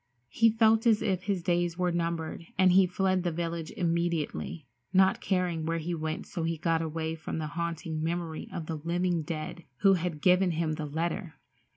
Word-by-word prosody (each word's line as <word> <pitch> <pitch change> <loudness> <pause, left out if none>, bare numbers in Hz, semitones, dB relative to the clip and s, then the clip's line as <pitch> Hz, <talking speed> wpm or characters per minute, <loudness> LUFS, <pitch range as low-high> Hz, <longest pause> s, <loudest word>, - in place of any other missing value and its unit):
He 225 - +4
felt 225 +1 +4
as 220 -2 +4
if 190 -4 0
his 195 -4 -1
days 175 -1 +1
were 180 -1 +1
numbered 170 -1 -2
and 185 -1 +5
he 185 +1 +6
fled 185 0 +1
the 175 -1 -1
village 165 -1 -3
immediately, 170 -3 -1 0.3
not 190 0 +4
caring 180 -4 0
where 165 +1 -1
he 165 +2 -3
went 155 -1 -3
so 175 - -5
he 165 0 -1
got 165 +1 +1
away 160 0 -2
from 160 0 -5
the 155 - -2
haunting 165 -2 -3
memory 165 -1 -3
of 165 - -5
the 160 0 -4
living 170 +2 0
dead 155 +1 -5 0.2
who 195 -1 +6
had 175 -4 -1
given 180 +2 +4
him 160 -1 0
the 155 -1 -4
letter. 165 +4 -3
170 Hz, 190 wpm, -29 LUFS, 160-180 Hz, 0.3 s, he